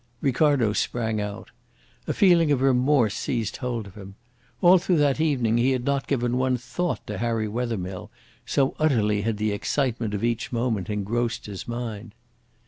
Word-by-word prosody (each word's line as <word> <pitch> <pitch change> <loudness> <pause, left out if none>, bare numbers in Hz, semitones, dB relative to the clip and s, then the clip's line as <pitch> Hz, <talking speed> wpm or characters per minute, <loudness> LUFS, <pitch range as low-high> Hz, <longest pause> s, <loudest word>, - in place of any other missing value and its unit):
Ricardo 135 -5 +2
sprang 110 -1 -1
out. 105 +1 -6 0.6
A - - 0
feeling 170 -5 +4
of 140 - +2
remorse 130 -4 +3
seized 115 -5 -2
hold 120 -4 -3
of 100 - -12
him. 95 -1 -11 0.4
All 180 +1 +6
through 180 -1 +1
that 145 0 +2
evening 125 -7 +1
he 130 +3 +3
had 125 -1 -2
not 140 -1 0
given 125 -2 0
one 130 -1 +1
thought 175 +8 -3
to 105 -2 -5
Harry 115 -1 -1
Wethermill, 105 -5 -4 0.3
so 135 -1 +1
utterly 110 -9 +2
had 110 0 -1
the 105 0 0
excitement 115 0 -1
of 100 - -4
each 120 0 -1
moment 115 -4 -1
engrossed 115 +3 -2
his 100 -3 -7
mind. 115 -2 -6
120 Hz, 165 wpm, -25 LUFS, 105-135 Hz, 0.6 s, All